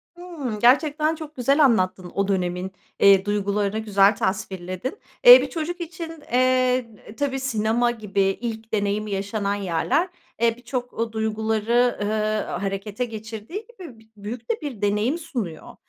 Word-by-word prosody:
Hıı, 305 Hz, -12 st, -6 dB
gerçekten 300 Hz, +5 st, +3 dB
çok 310 Hz, -1 st, -9 dB
güzel 275 Hz, +4 st, +3 dB
anlattın 185 Hz, -6 st, +1 dB
o 200 Hz, 0 st, +1 dB
dönemin, 180 Hz, -1 st, -1 dB, 0.3 s
eee, 195 Hz, -1 st, +6 dB
duygularını, 205 Hz, +1 st, 0 dB
güzel 200 Hz, -1 st, +4 dB
tasvirledin. 190 Hz, -, -3 dB, 0.3 s
Eee, -, -, +11 dB
bir -, -, -3 dB
çocuk 345 Hz, +1 st, -4 dB
için, 330 Hz, -2 st, -7 dB
eee, 255 Hz, -1 st, +3 dB
eee, 210 Hz, -, -14 dB
tabii, 275 Hz, -2 st, -1 dB
sinema 240 Hz, -1 st, +1 dB
gibi 210 Hz, -4 st, -2 dB
ilk 220 Hz, +3 st, -2 dB
deneyim 205 Hz, +1 st, 0 dB
yaşanan 200 Hz, 0 st, -2 dB
yerler, 205 Hz, -, 0 dB, 0.3 s
eee, 230 Hz, 0 st, +3 dB
birçok 245 Hz, 0 st, -5 dB
o 225 Hz, 0 st, -3 dB
duyguları, 220 Hz, +2 st, +1 dB
ııı, 215 Hz, +1 st, 0 dB, 0.2 s
harekete 200 Hz, +4 st, -3 dB
geçirdiği 225 Hz, -, -7 dB
gibi, 335 Hz, -, -12 dB
bi 220 Hz, 0 st, -22 dB
büyük 225 Hz, -, -7 dB
de 445 Hz, -, -3 dB
bir 265 Hz, -9 st, -6 dB
deneyim 210 Hz, +9 st, +1 dB
sunuyor. 235 Hz, -, -6 dB
220 Hz, 145 wpm, -23 LUFS, 200-265 Hz, 0.3 s, Eee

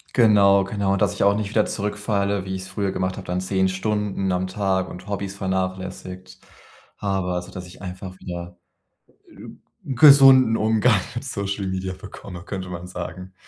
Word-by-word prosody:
Genau, 100 Hz, -5 st, +5 dB
genau, 100 Hz, 0 st, 0 dB
dass 100 Hz, -2 st, +1 dB
ich -, -, -1 dB
auch 100 Hz, 0 st, +4 dB
nicht 105 Hz, -1 st, -2 dB
wieder 110 Hz, -1 st, +3 dB
zurückfalle, 100 Hz, -1 st, -1 dB
wie 95 Hz, 0 st, -3 dB
ich's 95 Hz, 0 st, -6 dB
früher 95 Hz, 0 st, -2 dB
gemacht 95 Hz, -1 st, -2 dB
habe, 95 Hz, -, -8 dB
dann 90 Hz, +1 st, -1 dB
10 95 Hz, 0 st, +1 dB
Stunden 100 Hz, 0 st, -1 dB
am 90 Hz, +1 st, -1 dB
Tag 95 Hz, -1 st, -1 dB
und 90 Hz, +3 st, -10 dB
Hobbys 100 Hz, -1 st, -4 dB
vernachlässigt. 95 Hz, -1 st, -4 dB, 0.6 s
Aber 95 Hz, -3 st, -1 dB
also, 90 Hz, +2 st, -5 dB
dass 90 Hz, -1 st, -8 dB
ich 90 Hz, -, -14 dB
einfach 95 Hz, 0 st, -7 dB
wieder 90 Hz, 0 st, -7 dB, 0.7 s
g -, -, -12 dB, 0.3 s
gesunden 135 Hz, -3 st, +7 dB
Umgang 110 Hz, 0 st, +3 dB, 0.2 s
mit 120 Hz, +3 st, -5 dB
Social 100 Hz, -5 st, -3 dB
Media 95 Hz, 0 st, -3 dB
bekomme, 95 Hz, -2 st, -10 dB
könnte 95 Hz, -2 st, -5 dB
man 90 Hz, 0 st, -7 dB
sagen. 90 Hz, +1 st, -7 dB
95 Hz, 165 wpm, -23 LUFS, 95-105 Hz, 0.7 s, gesunden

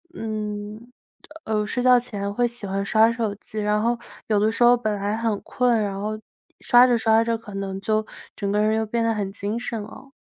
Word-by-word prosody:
嗯， 215 Hz, +1 st, -5 dB, 0.5 s
呃， 215 Hz, -1 st, -1 dB
睡 245 Hz, +3 st, -2 dB
觉 250 Hz, -1 st, +6 dB
前 200 Hz, -4 st, -4 dB
会 245 Hz, +2 st, +2 dB
喜 235 Hz, -3 st, -7 dB
欢 195 Hz, 0 st, -2 dB
刷 220 Hz, +2 st, +4 dB
手 225 Hz, -3 st, -2 dB
机， 215 Hz, +1 st, -8 dB
然 210 Hz, 0 st, +1 dB
后 235 Hz, +1 st, +1 dB, 0.3 s
有 210 Hz, -2 st, +2 dB
的 215 Hz, +2 st, +3 dB
时 235 Hz, -, +1 dB
候 240 Hz, +1 st, +7 dB
本 215 Hz, -3 st, -1 dB
来 205 Hz, +1 st, -2 dB
很 225 Hz, -3 st, -1 dB
困， 245 Hz, -2 st, +1 dB
然 195 Hz, -1 st, -3 dB
后 215 Hz, +1 st, -3 dB, 0.4 s
刷 245 Hz, 0 st, +6 dB
着 240 Hz, -1 st, +3 dB
刷 225 Hz, 0 st, +3 dB
着 230 Hz, 0 st, 0 dB
可 215 Hz, -2 st, -12 dB
能 195 Hz, -1 st, -4 dB
就 215 Hz, +1 st, 0 dB, 0.3 s
整 200 Hz, -1 st, -2 dB
个 210 Hz, -, +1 dB
人 215 Hz, +1 st, +2 dB
就 220 Hz, -, -1 dB
变 230 Hz, +2 st, -1 dB
得 230 Hz, 0 st, +2 dB
很 200 Hz, -3 st, -3 dB
精 205 Hz, +3 st, -3 dB
神 235 Hz, -3 st, -4 dB
了。 265 Hz, +6 st, -12 dB
220 Hz, 235 characters per minute, -23 LUFS, 205-235 Hz, 0.5 s, 候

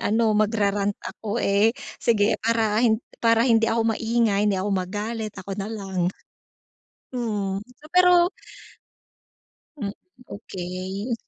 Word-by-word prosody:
ano 220 Hz, 0 st, +2 dB
mag-rarant 205 Hz, -1 st, +1 dB
ako 220 Hz, +2 st, -4 dB
eh, 200 Hz, +3 st, +3 dB, 0.2 s
sige 215 Hz, -2 st, +2 dB
para 225 Hz, -2 st, +2 dB
hin 220 Hz, -1 st, +3 dB, 0.2 s
para 230 Hz, 0 st, +5 dB
hindi 225 Hz, -1 st, +4 dB
ako 225 Hz, 0 st, +1 dB
maingay, 225 Hz, -3 st, +1 dB
hindi 205 Hz, -2 st, +2 dB
ako 200 Hz, +2 st, -1 dB
magalit, 210 Hz, +4 st, -3 dB
ako 190 Hz, -, -9 dB
nalang. 195 Hz, -3 st, -2 dB, 1.0 s
Mhm, 205 Hz, -5 st, -2 dB, 0.2 s
so 300 Hz, -, -20 dB
pero 360 Hz, 0 st, +5 dB, 1.5 s
Hmm, 205 Hz, -7 st, -4 dB, 0.4 s
okey. 190 Hz, +3 st, -5 dB
215 Hz, 110 wpm, -24 LUFS, 200-230 Hz, 1.5 s, para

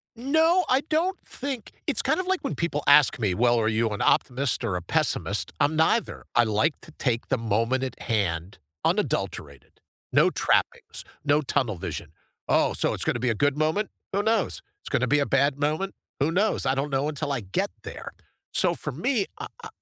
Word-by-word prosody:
No, 320 Hz, +9 st, +3 dB
I 260 Hz, +1 st, +4 dB
don't 330 Hz, +6 st, 0 dB
think 265 Hz, -4 st, -5 dB
it's -, -, +1 dB
kind -, -, +1 dB
of 370 Hz, -, -1 dB
like 380 Hz, -1 st, +1 dB
when 275 Hz, -, -3 dB
people 165 Hz, -4 st, -2 dB
ask 145 Hz, -2 st, +6 dB
me, 105 Hz, -5 st, +1 dB
well, 120 Hz, +4 st, +3 dB
are 110 Hz, -, +1 dB
you 110 Hz, +1 st, +1 dB
an 105 Hz, -1 st, -4 dB
optimist 130 Hz, -1 st, +1 dB
or 105 Hz, -6 st, -1 dB
a 90 Hz, -, -2 dB
pessimist? 85 Hz, -, 0 dB
I'm 150 Hz, +2 st, +2 dB
neither. 160 Hz, +9 st, +1 dB
I 120 Hz, -, +6 dB
like 110 Hz, +8 st, +1 dB
to -, -, -14 dB
take 120 Hz, -6 st, -1 dB
the 130 Hz, -, +1 dB
moment 115 Hz, +4 st, 0 dB
at 130 Hz, -, -5 dB
hand, 95 Hz, -5 st, -1 dB, 0.3 s
unadulterated, 70 Hz, -3 st, -2 dB, 0.3 s
no -, -, +5 dB
trappings, -, -, 0 dB, 0.2 s
no 145 Hz, +1 st, +3 dB
tunnel 125 Hz, -6 st, 0 dB
vision. 80 Hz, -4 st, -6 dB, 0.4 s
Oh, -, -, +3 dB
so -, -, 0 dB
it's -, -, -4 dB
gonna 120 Hz, -, 0 dB
be 125 Hz, -, 0 dB
a 115 Hz, -, +1 dB
good 145 Hz, +5 st, +1 dB
moment? 160 Hz, +7 st, 0 dB, 0.2 s
Who 200 Hz, +1 st, +1 dB
knows? 225 Hz, +1 st, 0 dB, 0.2 s
It's -, -, -9 dB
gonna 125 Hz, -, +1 dB
be 145 Hz, +3 st, +3 dB
a 140 Hz, -, +2 dB
bad 140 Hz, +1 st, +2 dB
moment. 155 Hz, +7 st, -1 dB, 0.3 s
Who 145 Hz, +3 st, +2 dB
knows? 200 Hz, +5 st, +1 dB
I 130 Hz, -, +2 dB
don't 140 Hz, +2 st, -1 dB
know 140 Hz, +1 st, 0 dB
until 145 Hz, -1 st, -3 dB
I 135 Hz, -4 st, -1 dB
get 95 Hz, -2 st, -1 dB
there. -, -, -8 dB, 0.4 s
So -, -, +2 dB
for -, -, -5 dB
me, 205 Hz, -, 0 dB
I -, -, -5 dB, 0.2 s
I -, -, -5 dB
140 Hz, 200 wpm, -26 LUFS, -, 0.4 s, ask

